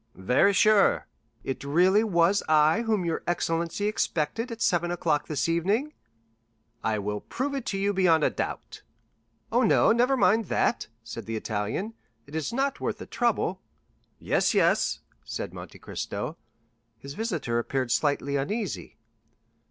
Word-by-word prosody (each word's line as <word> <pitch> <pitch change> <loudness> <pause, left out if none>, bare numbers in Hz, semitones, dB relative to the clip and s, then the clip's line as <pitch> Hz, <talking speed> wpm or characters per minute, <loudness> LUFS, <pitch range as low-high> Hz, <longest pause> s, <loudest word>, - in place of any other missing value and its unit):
"Very 125 - +3
sure." 210 +1 +4 0.4
"It 135 - -4
really 180 +9 +4
was 190 -1 +3
I 155 +6 +4
whom 215 -6 0
your 165 -1 -1
excellency 170 +2 -1
expected 210 - -1
at 230 - -6
seven 175 -5 +1
o'clock 165 -4 0
this 145 -2 -1
evening?" 200 - 0 0.9
"I 110 -1 0
will 105 0 -3
prove 275 +3 -3
it 270 -3 -4
to 195 - -1
you 200 +1 0
beyond 175 -5 +3
a - - +3
doubt." - - -5 0.7
"Oh, 240 +2 +3
no, 225 -1 +4
never 245 +4 +3
mind 225 -2 +3
that," - - 0 0.2
said 115 -1 -8
the 115 - -3
Italian; 110 - -3 0.3
"it 140 - -16
is 155 -2 -2
not 270 +3 -1
worth - - -2
the - - -8
trouble." 215 -6 -1 0.6
"Yes, - - +1
yes," - - +2 0.2
said - - -5
Monte - - -10
Cristo. - - -5 0.6
His 140 +4 -9
visitor 160 - -2
appeared 130 +1 -2
slightly 140 0 +1
uneasy. 200 +8 -4
175 Hz, 145 wpm, -27 LUFS, 145-220 Hz, 0.9 s, sure